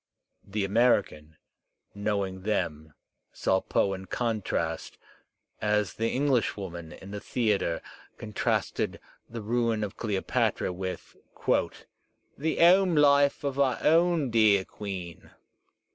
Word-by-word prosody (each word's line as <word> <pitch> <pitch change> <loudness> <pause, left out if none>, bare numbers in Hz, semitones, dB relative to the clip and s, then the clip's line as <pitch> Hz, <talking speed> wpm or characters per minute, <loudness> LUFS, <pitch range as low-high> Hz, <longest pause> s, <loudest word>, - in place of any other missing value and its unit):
The 100 0 -2
American, 100 - +1 0.6
knowing 100 -2 -2
them, 80 -7 -2 0.4
saw 95 0 +1
Poe 100 - +1
in 95 0 -7
contrast, 115 -1 -2 0.6
as 105 -1 +1
the 115 +1 -1
Englishwoman 100 - -1
in 95 +5 -11
the 105 - -5
thea 110 -2 0
tre 85 -1 -2 0.4
contrasted 105 -2 -2 0.3
the 115 -1 -6
ruin 115 -1 0
of 100 - -5
Cleopatra 100 -3 -1
with 95 0 -6 1.2
"the 160 +3 -2
'ome 180 +1 +6
life 140 -1 +4
of 140 -1 -2
our 135 -2 +3
own 165 -4 +3
dear 105 -4 +4
Queen." 95 -5 -7
105 Hz, 110 wpm, -28 LUFS, 95-125 Hz, 1.2 s, ome